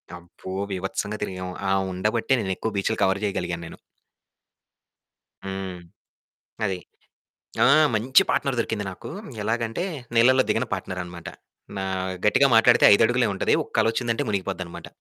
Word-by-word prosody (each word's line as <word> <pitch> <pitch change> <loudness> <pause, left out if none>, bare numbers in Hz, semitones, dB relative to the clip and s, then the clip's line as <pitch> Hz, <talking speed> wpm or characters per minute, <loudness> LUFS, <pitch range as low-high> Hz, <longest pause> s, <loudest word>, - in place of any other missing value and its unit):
అబ్బో! 90 +2 -11 0.2
బీభత్సంగా 95 +3 -3
తిరిగాము. 90 -2 -5 0.2
ఆవుండ 95 0 -1
బట్టే 135 - +1
నేను 95 -2 -1
ఎక్కువ 110 - -3
బీచులు 110 +3 -1
కవర్ 95 +1 +1
చేయగలిగాను 85 -4 -2
నేను. - - -11 1.7
హ్మ్ 95 -2 -5 0.9
అది. 95 -3 -1 0.9
ఆ! - - +6 0.3
మంచి 130 +5 +4
పార్ట్‌నర్ 135 -3 0
దొరికింది 110 -3 -2
నాకు. - - -10 0.3
ఎలాగంటే 115 - -1 0.3
నీళ్ళల్లో 130 +3 +5
దిగని - - +1
పార్ట్‌నర్ 95 -1 -4
అనమాట. 85 -1 -10 0.5
నా 95 - -2 0.4
గట్టిగా 135 +6 +5
మాట్లాడితే 115 - +6
5 115 - +5
అడుగులే 120 -1 +2
ఉంటది. - - +1
ఒక్క - - -14
అలొచ్చిందంటే 115 +3 0
మునిగిపోద్దనమాట. 95 -3 -4
100 Hz, 130 wpm, -24 LUFS, 95-115 Hz, 1.7 s, ఆ